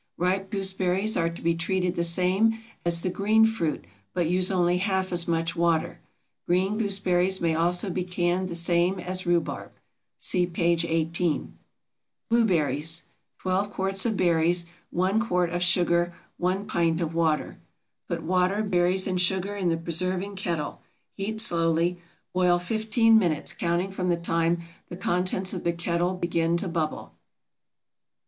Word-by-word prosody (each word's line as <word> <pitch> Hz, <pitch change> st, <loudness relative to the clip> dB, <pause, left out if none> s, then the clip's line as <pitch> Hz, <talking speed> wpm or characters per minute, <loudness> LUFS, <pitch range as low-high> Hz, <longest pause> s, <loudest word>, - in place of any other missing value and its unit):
Ripe 190 Hz, +2 st, 0 dB
gooseberries 190 Hz, +1 st, 0 dB
are 165 Hz, 0 st, +1 dB
to 170 Hz, -, -9 dB
be 170 Hz, 0 st, +3 dB
treated 180 Hz, +2 st, -1 dB
the 170 Hz, -, -1 dB
same 185 Hz, +6 st, +2 dB, 0.3 s
as 170 Hz, -1 st, +1 dB
the 185 Hz, -, -1 dB
green 215 Hz, +4 st, +4 dB
fruit, 220 Hz, -9 st, -1 dB, 0.3 s
but 175 Hz, -3 st, +1 dB
use 180 Hz, +2 st, +2 dB
only 180 Hz, -2 st, +2 dB
half 190 Hz, -1 st, 0 dB
as 175 Hz, -1 st, 0 dB
much 165 Hz, 0 st, -1 dB
water. 170 Hz, -2 st, +1 dB, 0.5 s
Green 190 Hz, +5 st, +1 dB
gooseberries 190 Hz, -3 st, +1 dB
may 165 Hz, -1 st, +1 dB
also 175 Hz, +4 st, +1 dB
be 180 Hz, +1 st, -2 dB
canned 180 Hz, +1 st, -1 dB
the 170 Hz, -, -4 dB
same 175 Hz, +2 st, +2 dB
as 185 Hz, 0 st, -2 dB
rhubarb 175 Hz, -1 st, 0 dB, 0.5 s
(see 180 Hz, -2 st, +1 dB
p. 175 Hz, 0 st, -3 dB
18). 170 Hz, 0 st, 0 dB, 0.8 s
BLUEBERRIES. 165 Hz, -8 st, +1 dB, 0.3 s
12 190 Hz, +2 st, -1 dB
quarts 195 Hz, 0 st, -1 dB
of 220 Hz, -3 st, -1 dB
berries. 170 Hz, 0 st, +2 dB, 0.2 s
1 190 Hz, +4 st, +1 dB
quart 180 Hz, -6 st, 0 dB
of 175 Hz, +1 st, -2 dB
sugar. 175 Hz, -1 st, +2 dB, 0.3 s
1 185 Hz, +3 st, -1 dB
pint 170 Hz, -5 st, +1 dB
of 165 Hz, -2 st, -2 dB
water. 160 Hz, -2 st, 0 dB, 0.5 s
Put -, -, -3 dB
water, 185 Hz, +4 st, +1 dB
berries, 185 Hz, -1 st, +1 dB
and 185 Hz, -1 st, 0 dB
sugar 190 Hz, +3 st, 0 dB
in 190 Hz, -3 st, 0 dB
the 165 Hz, -, +1 dB
preserving 185 Hz, +4 st, -2 dB
kettle; 170 Hz, -6 st, -3 dB, 0.3 s
heat 215 Hz, +2 st, -3 dB
slowly. 170 Hz, -3 st, +1 dB, 0.3 s
Boil 180 Hz, -1 st, +3 dB
fifteen 220 Hz, +4 st, +3 dB
minutes, 165 Hz, -7 st, 0 dB
counting 175 Hz, +3 st, -1 dB
from 185 Hz, -1 st, -2 dB
the 175 Hz, -, +2 dB
time 170 Hz, 0 st, 0 dB, 0.3 s
the 175 Hz, -, -7 dB
contents 185 Hz, +1 st, 0 dB
of -, -, -4 dB
the 170 Hz, -, +2 dB
kettle 170 Hz, +2 st, -1 dB
begin 170 Hz, -1 st, 0 dB
to 190 Hz, -, -3 dB
bubble. 165 Hz, -3 st, -3 dB
180 Hz, 150 wpm, -26 LUFS, 170-190 Hz, 0.8 s, green